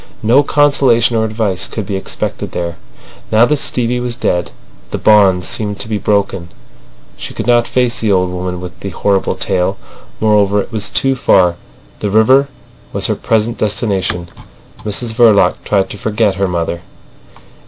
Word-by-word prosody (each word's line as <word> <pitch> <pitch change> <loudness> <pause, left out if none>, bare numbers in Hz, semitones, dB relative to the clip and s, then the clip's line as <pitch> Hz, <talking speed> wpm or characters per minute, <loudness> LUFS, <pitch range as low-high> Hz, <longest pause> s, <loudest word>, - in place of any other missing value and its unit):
No 120 +6 +5
consolation 135 -6 +3
or 110 0 +1
advice 110 -4 -1
could 110 - -5
be 100 0 -3
expected 95 - -4
there. 85 -1 -4 0.5
Now 110 +2 +5
that 150 +3 +1
Stevie 125 -2 -1
was 120 -1 -3
dead 90 -8 -1 0.4
the - - -3
bond 95 -4 +4
seemed 105 -2 -3
to - - -3
be 110 -2 -2
broken. 95 -4 -1 0.7
She - - -8
could - - -4
not 120 -1 +3
face 125 -2 0
the 110 -2 +1
old 90 -1 +1
woman 90 0 -4
with 90 0 -9
the 100 - -5
horrible 95 +1 0
tale. 95 0 -1 0.4
Moreover, 105 -2 +3
it 100 - -4
was 110 -2 -3
too 135 0 +1
far. 90 -8 +3 0.4
The 105 - -2
river 130 +7 +4 0.4
was - - -2
her - - 0
present 115 +1 -1
destination. 100 -4 -1 0.5
Mrs 110 +2 -2
Verloc 110 -6 +4
tried 95 -2 0
to 105 - -8
forget 105 -1 0
her 100 0 -1
mother. 85 -1 -3
105 Hz, 165 wpm, -15 LUFS, 95-115 Hz, 0.7 s, No